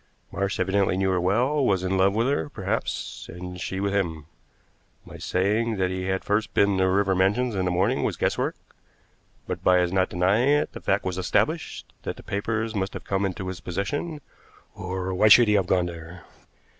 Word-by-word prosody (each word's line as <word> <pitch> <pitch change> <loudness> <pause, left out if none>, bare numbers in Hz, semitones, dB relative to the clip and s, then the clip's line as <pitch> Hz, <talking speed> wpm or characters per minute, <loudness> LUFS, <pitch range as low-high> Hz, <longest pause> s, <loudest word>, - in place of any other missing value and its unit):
Marsh 100 0 -2
evidently 95 0 +1
knew 95 0 +1
her 90 -1 +1
well; 125 +11 +1
was 95 -6 +2
in 95 +1 0
love 95 +1 +3
with 115 +2 +2
her, 125 - 0
perhaps, - - -4
and 90 +1 -8
she 95 - -3
with 100 0 -1
him. 80 -6 -1 0.8
My - - -11
saying 105 +5 0
that 95 -1 0
he 95 0 -3
had 95 0 -1
first 105 +1 -1
been 100 -1 +3
to 95 - +3
River 95 +1 +2
Mansions 105 +6 +1
in 95 -2 -1
the - - +1
morning 95 +9 +1
was - - -1
guesswork, - - 0 0.9
but - - -5
by 90 0 +5
his 90 0 +1
not 95 -1 +2
denying 100 +9 +2
it, 145 +1 +2
the - - -8
fact 95 0 0
was 95 0 -2
established 90 - -1
that - - -4
the - - -13
papers 110 +2 -2
must 95 -2 -2
have - - -6
come 95 0 0
into 95 0 -5
his 95 -2 -5
possession, 145 - -3 0.5
or 95 0 -4
why 100 +4 +4
should 115 +2 +8
he 105 - +3
have 100 -3 +2
gone 90 -1 +2
there? 85 0 -9
95 Hz, 200 wpm, -25 LUFS, 90-105 Hz, 0.9 s, should